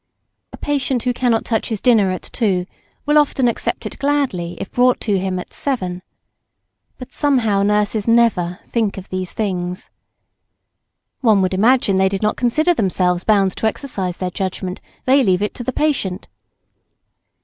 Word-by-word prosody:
A - - -10
patient 270 -4 -1
who 250 - 0
cannot 240 -2 +1
touch 225 -2 -1
his 220 -3 -2
dinner 220 -5 +4
at 185 - -4
two, 190 -7 -1 0.4
will 295 +1 +5
often 270 -3 +2
accept 235 - -2
it - - -7
gladly, 275 -12 -1
if - - -6
brought 250 0 +3
to 205 -4 0
him 185 0 -2
at 180 - -7
seven. 185 -10 -2 1.0
But 255 - -11
somehow 240 -9 +2
nurses 210 +1 +1
never 225 -7 +2
"think 220 -4 -1
of 190 - -9
these 185 -1 -4
things." 180 -4 -3 1.3
One 215 -7 +3
would 185 - 0
imagine 215 0 +3
they 190 0 +3
did 195 +1 -3
not 210 - +1
consider 310 +8 +2
themselves 180 - 0
bound 200 -3 +2
to 220 - +1
exercise 200 -7 -3
their 185 -1 -3
judgment; 185 0 -4 0.2
they 270 +2 +5
leave 190 -2 +2
it 210 - -2
to 245 - -7
the 260 - -2
patient. 255 -11 -1
210 Hz, 160 wpm, -19 LUFS, 185-250 Hz, 1.3 s, will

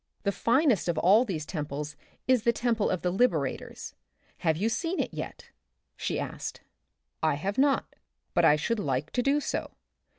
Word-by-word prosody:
The 200 - +2
finest 235 - +2
of 170 -2 0
all 200 +9 +5
these 165 -9 -3
temples 150 -2 -4 0.3
is 255 -3 +4
the 235 - +3
Temple 235 -3 +1
of 185 - -1
the 180 - +1
Liberators; 175 - 0 0.5
have 160 -2 +1
you 205 +6 +1
seen 330 +11 -1
it - - -1
yet? - - -7 0.2
— - - -50 0.2
she - - -2
asked. - - -5 0.6
I 155 -2 +2
have 195 - -2
not, 275 0 +2 0.4
but - - +3
I 150 - +7
should 215 +10 -1
like 145 -4 -1
to 250 - +1
do 275 +3 +3
so. - - -3
200 Hz, 175 wpm, -28 LUFS, 155-240 Hz, 0.6 s, I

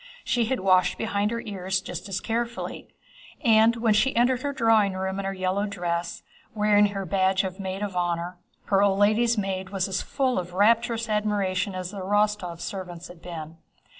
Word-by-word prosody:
She 240 -2 +1
had 255 0 -1
washed 185 -1 +3
behind 205 -2 0
her 230 +1 -3
ears 190 -4 -2
just 195 - -7
as 195 0 -2
carefully, 235 +1 -3 0.5
and 225 -3 +5
when 230 -2 +2
she 215 +6 +2
entered 245 +2 +3
her 285 - -2
drawing 225 -6 +3
room 190 +1 -3
in 195 - -3
her 195 - -1
yellow 190 +2 -1
dress, 175 -3 -3 0.3
wearing 210 -1 +4
her 195 -1 -4
badge 190 +2 +2
as 190 +1 -6
maid 190 +1 -4
of 200 -3 -4
honor, 175 0 -2 0.3
her 195 -1 +3
old 200 -1 +3
lady's 220 +3 +3
maid 190 -2 -2
was 195 -1 -1
as 190 -1 -1
full 265 -5 0
of 175 0 -7
rapturous 230 +3 +3
admiration 205 -3 0
as 185 0 -4
the 200 - -7
Rostóvs' 205 -3 0
servants 180 -3 -6
had 175 -1 -13
been. 165 -2 -8
200 Hz, 185 wpm, -26 LUFS, 185-220 Hz, 0.5 s, and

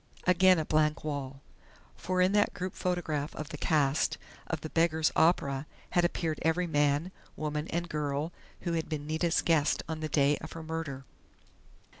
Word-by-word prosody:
Again 185 0 +6
a 160 - -1
blank 155 0 +1
wall! 140 -3 -4 0.5
For 185 0 -1
in 185 +1 +4
that 205 0 +2
group 185 +1 -4
photograph 160 -5 -2
of 155 - -6
the 150 - -6
cast 145 -2 +2 0.3
of 160 -2 -3
"The 155 - -5
Beggar's 160 -1 +2
Opera" 145 -4 +2 0.2
had 175 - +3
appeared 165 -3 -1
every 160 +3 +2
man, 145 +2 +1 0.2
woman 150 0 -3
and 170 +1 -2
girl 150 +1 -2 0.3
who 170 -1 -2
had 165 -2 -2
been 150 -2 -3
Nita's 160 +2 +1
guest 160 -3 +2
on 160 -1 -4
the 155 0 -3
day 145 0 +3
of - - -8
her 165 - -7
murder.... 155 -4 -5
155 Hz, 170 wpm, -30 LUFS, 150-170 Hz, 0.5 s, Again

